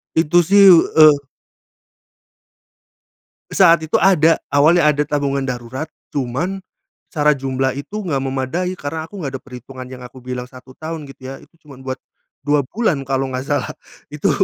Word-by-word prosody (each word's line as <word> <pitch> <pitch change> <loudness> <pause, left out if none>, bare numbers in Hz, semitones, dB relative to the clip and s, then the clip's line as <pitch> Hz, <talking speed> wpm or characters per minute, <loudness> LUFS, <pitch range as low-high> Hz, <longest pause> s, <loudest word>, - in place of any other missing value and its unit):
Itu, 160 +2 +4
sih, 200 +4 +5 0.3
eee 155 -2 +7 2.3
Saat 170 -4 +5
itu 160 0 0
ada. 165 -3 +4 0.2
Awalnya 155 +4 +4
ada 145 - -1
tabungan 140 -1 -1
darurat, 130 +3 -5 0.2
cuman, 145 +9 -3 0.5
secara 150 -2 +2
jumlah 135 -1 -2
itu 195 +10 -6
enggak 140 -6 -1
memadai 135 +7 -2
karena 160 +2 -5
aku 205 - -11
nggak 150 -8 -4
ada - - -22
perhitungan 130 0 -10
yang 125 -1 -10
aku 125 +1 -13
bilang 125 0 -5
1 130 +1 -16
tahun 155 -2 -7
gitu, 135 - -14
ya. 135 - -12
Itu 165 - -22
cuman 135 -3 -13
buat 130 0 -5 0.5
2 145 0 +2
bulan 200 -10 0
kalau 135 0 -1
nggak 130 - -2
salah. - - -1 0.4
Itu, - - 0
145 Hz, 155 wpm, -19 LUFS, 130-165 Hz, 2.3 s, eee